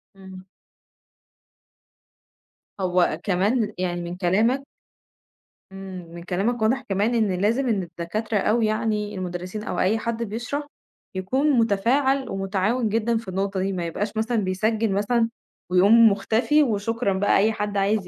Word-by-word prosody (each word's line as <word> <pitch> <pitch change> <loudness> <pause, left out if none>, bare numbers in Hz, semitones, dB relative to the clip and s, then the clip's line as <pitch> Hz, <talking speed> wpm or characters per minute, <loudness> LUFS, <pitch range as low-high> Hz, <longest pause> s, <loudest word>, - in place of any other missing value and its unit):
إمم. 190 -1 -12 2.3
هو 180 -4 +1
كمان 210 +3 +1
يعني 175 -1 -2
من 175 +1 -6
كلامك 220 +9 +1 1.1
إمم 190 -2 -8
من 170 - -8
كلامك 200 +7 -1
واضح 250 +5 +2
كمان 205 +5 +1
إن 200 -5 +1
لازم 235 +6 +1
إن 205 -4 +1
الدكاترة 175 +6 -3
أو 215 +4 +2
يعني 215 -1 -1
المُدرّسين 185 +3 -5
أو - - -3
أي 200 +4 +2
حد 235 0 -2
بيشرح، 245 +7 -4 0.5
يكون 260 +11 0
مُتفاعل 255 +6 +2
ومُتعاون 195 +4 0
جدًا 225 +2 +1
في 225 - -7
النُقطة 195 +1 -2
دي، 195 +1 -1
ما 175 -2 -3
يبقاش 205 +6 -3
مثلًا 230 +2 0
بيسجِّل 215 +3 0
مثلًا، 225 +4 +1 0.4
ويقوم 210 +6 +6
مُختفي 225 +9 +2
وشكرًا 225 -2 -1
بقى 195 +2 +2
أي 215 +3 +3
حد 205 -1 -3
عايز 200 0 +1
210 Hz, 135 wpm, -24 LUFS, 190-230 Hz, 2.3 s, ويقوم